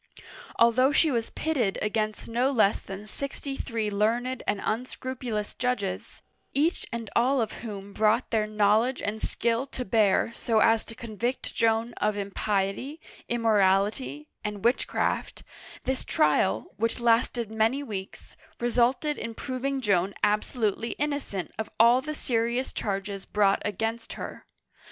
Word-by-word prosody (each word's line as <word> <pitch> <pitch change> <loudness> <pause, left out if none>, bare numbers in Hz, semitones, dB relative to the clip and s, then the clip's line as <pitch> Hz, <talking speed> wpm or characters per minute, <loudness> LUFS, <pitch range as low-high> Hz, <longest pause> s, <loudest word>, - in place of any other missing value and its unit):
Although 245 +4 +5
she 310 +1 +4
was 230 -3 -1
pitted 260 -11 0
against 215 0 -1
no 240 +3 +1
less 220 -5 +3
than 195 +1 -8
sixty 275 +3 -4
three 225 -5 -2
learned 235 +5 0
and 205 - +1
unscrupulous 245 -2 -3
judges, 220 -7 -3 0.3
each 310 +5 +1
and 230 -2 -5
all 260 +3 +3
of 220 -3 0
whom 200 -3 -7
brought 220 +4 +2
their 215 -2 +2
knowledge 215 +4 +2
and 215 +2 -2
skill 235 +3 0
to 255 -2 -5
bear 215 +2 +3
so 230 -1 0
as 225 0 +4
to 225 - -8
convict 235 +3 -3
Joan 230 +1 +1
of 210 0 0
impiety, 200 +7 -1 0.3
immorality, 195 - +2 0.2
and 210 -1 -4
witchcraft, 240 +3 0 0.4
this 265 0 -1
trial, 110 -8 +2
which 230 +3 0
lasted 235 -1 +2
many 225 +6 +1
weeks, 195 -7 -7 0.2
resulted 245 +5 +1
in 230 -1 -5
proving 265 +2 -2
Joan 195 -3 +1
absolutely 210 +1 +1
innocent 285 - -2
of 220 - -2
all 235 +3 +6
the 305 +2 -5
serious 240 0 0
charges 195 -1 -3
brought 200 -1 +3
against 225 +3 -3
her. - - -8
225 Hz, 135 wpm, -27 LUFS, 205-250 Hz, 0.4 s, all